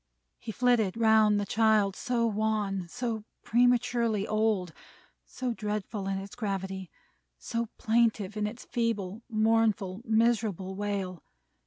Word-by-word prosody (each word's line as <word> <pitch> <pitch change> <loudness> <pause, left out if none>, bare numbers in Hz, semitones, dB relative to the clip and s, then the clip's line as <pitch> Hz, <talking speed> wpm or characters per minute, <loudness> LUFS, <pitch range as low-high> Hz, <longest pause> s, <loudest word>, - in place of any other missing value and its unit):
He 225 - -6
flitted 225 -3 +2
round 220 -2 +4
the 205 - -1
child: 215 -2 +3
so 240 -2 0
wan, 210 -4 -1
so 235 -1 -3 0.2
prematurely 240 -3 +2
old, 215 -5 0 0.5
so 250 -1 -3
dreadful 210 -2 -4
in 195 0 -1
its 195 0 -7
gravity, 190 -4 -4 0.5
so 230 - -3
plaintive 220 -3 +1
in 210 0 0
its 230 +4 -8
feeble, 225 -3 -2
mournful, 215 -3 +1
miserable 220 -5 +1
wail. 195 -3 -3
215 Hz, 120 wpm, -29 LUFS, 195-230 Hz, 0.5 s, round